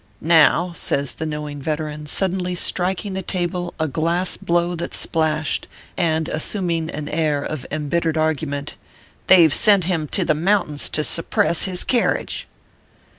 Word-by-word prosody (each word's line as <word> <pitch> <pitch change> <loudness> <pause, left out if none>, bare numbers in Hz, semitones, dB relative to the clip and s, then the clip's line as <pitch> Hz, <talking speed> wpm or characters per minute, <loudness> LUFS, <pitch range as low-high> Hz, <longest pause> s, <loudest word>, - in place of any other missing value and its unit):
Now," 170 +2 +4
says 140 -5 0
the 160 - -5
knowing 150 -1 -5
veteran, 150 0 -4
suddenly 180 +2 -1
striking 190 +3 -1
the 190 - -3
table 175 -1 -3
a 160 - 0
glass 170 +5 0
blow 175 +1 0
that 170 - -4
splashed, 155 -2 0 0.3
and 160 -3 0
as 155 - -3
suming 170 -5 -1
an 150 -2 -5
air 150 -2 0
of 155 -3 -5
embittered 160 +2 -1
argument 150 -2 -2 0.2
" - - -30
they 185 -3 +8
ve 155 - +2
sent 205 -4 +5
him 165 -3 -1
to 185 +4 +1
the 155 - +3
mountains 165 -2 0
to 155 - 0
suppress 170 +2 +1
his 185 -2 -2
kerridge." 245 -2 -1
160 Hz, 155 wpm, -21 LUFS, 150-180 Hz, 0.3 s, they